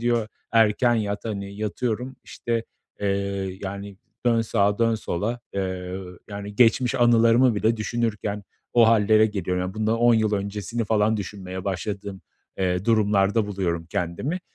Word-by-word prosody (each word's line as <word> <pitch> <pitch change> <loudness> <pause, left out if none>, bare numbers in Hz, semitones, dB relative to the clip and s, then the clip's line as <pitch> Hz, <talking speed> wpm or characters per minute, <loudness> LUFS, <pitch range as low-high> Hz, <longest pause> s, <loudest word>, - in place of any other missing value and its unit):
diyor, 120 -2 +1 0.2
"erken 115 +2 +4
yat" 105 -2 -2
hani, 100 -2 -4
yatıyorum, 120 +4 -3
işte, 115 -1 -3 0.4
eee, 100 - -1 0.6
yani, 100 0 -6 0.3
dön 115 -1 +4
sağa, 105 -2 +1
dön 115 -1 +3
sola, 110 +3 -3
eee, 95 -1 -3 0.4
yani 100 0 -6
geçmiş 125 +2 +4
anılarımı 120 0 +5
bile 110 +3 +1
düşünürken 110 -2 -2 0.3
o 115 -2 +6
hallere 110 -1 +5
geliyorum. 90 -3 -2
Ya, 90 +2 -4
bundan 110 +1 0
10 120 0 +5
yıl 110 -1 +2
öncesini 105 +3 -3
falan 110 0 +2
düşünmeye 95 -2 -6
başladığım, 100 +1 -4 0.4
eee, 90 0 0
durumlarda 105 -1 +2
buluyorum 85 -5 -2
kendimi. 125 - -2
105 Hz, 135 wpm, -24 LUFS, 100-115 Hz, 0.6 s, o